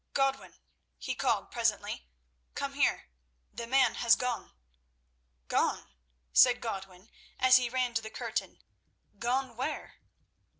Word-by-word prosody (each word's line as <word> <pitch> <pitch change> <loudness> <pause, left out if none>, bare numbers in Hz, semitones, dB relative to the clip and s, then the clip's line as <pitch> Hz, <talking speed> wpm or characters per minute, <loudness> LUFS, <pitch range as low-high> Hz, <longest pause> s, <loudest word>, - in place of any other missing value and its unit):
"Godwin," 270 -1 0 0.4
he - - -3
called - - 0
presently, 225 - -1 0.5
"come - - -3
here. 65 - 0 0.4
The 235 +2 -6
man 270 +2 +4
has 235 -1 +4
gone!" 250 -2 -3 1.0
"Gone?" - - 0 0.4
said 245 -1 +6
Godwin 195 -2 -7 0.3
as 255 0 +6
he 250 -2 0
ran 250 -1 0
to 225 - 0
the 220 - -7
curtain. - - -4 0.6
"Gone 250 0 -1
where?" 260 +6 -4
240 Hz, 120 wpm, -30 LUFS, 225-255 Hz, 1.0 s, said